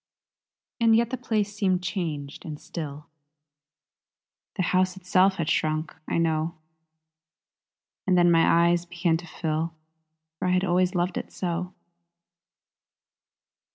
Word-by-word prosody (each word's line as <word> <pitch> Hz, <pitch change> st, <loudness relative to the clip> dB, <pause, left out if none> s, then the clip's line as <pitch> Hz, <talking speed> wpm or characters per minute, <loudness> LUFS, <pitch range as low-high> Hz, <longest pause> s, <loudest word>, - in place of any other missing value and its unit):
And 230 Hz, -1 st, +5 dB
yet 235 Hz, +1 st, +2 dB
the -, -, 0 dB
place 215 Hz, -4 st, -1 dB
seemed 185 Hz, -4 st, +1 dB
changed 155 Hz, -8 st, -4 dB
and 150 Hz, -2 st, -7 dB
still; 150 Hz, -3 st, -7 dB, 1.5 s
The 185 Hz, -, 0 dB
house 185 Hz, +1 st, +1 dB
itself 185 Hz, +1 st, +3 dB
had 165 Hz, -5 st, -2 dB
shrunk, 155 Hz, 0 st, 0 dB
I -, -, 0 dB
know. 165 Hz, 0 st, 0 dB, 1.5 s
And 185 Hz, -1 st, +4 dB
then 175 Hz, 0 st, +5 dB
my 170 Hz, 0 st, +5 dB
eyes 175 Hz, 0 st, +1 dB
began 170 Hz, -1 st, 0 dB
to 175 Hz, +1 st, -10 dB
fill 160 Hz, 0 st, -2 dB, 0.6 s
For 185 Hz, -, -1 dB
I 180 Hz, -, +2 dB
had 185 Hz, 0 st, +2 dB
always 180 Hz, 0 st, +2 dB
loved 175 Hz, 0 st, 0 dB
it -, -, -9 dB
so! 180 Hz, 0 st, -3 dB
175 Hz, 125 wpm, -26 LUFS, 165-185 Hz, 1.5 s, And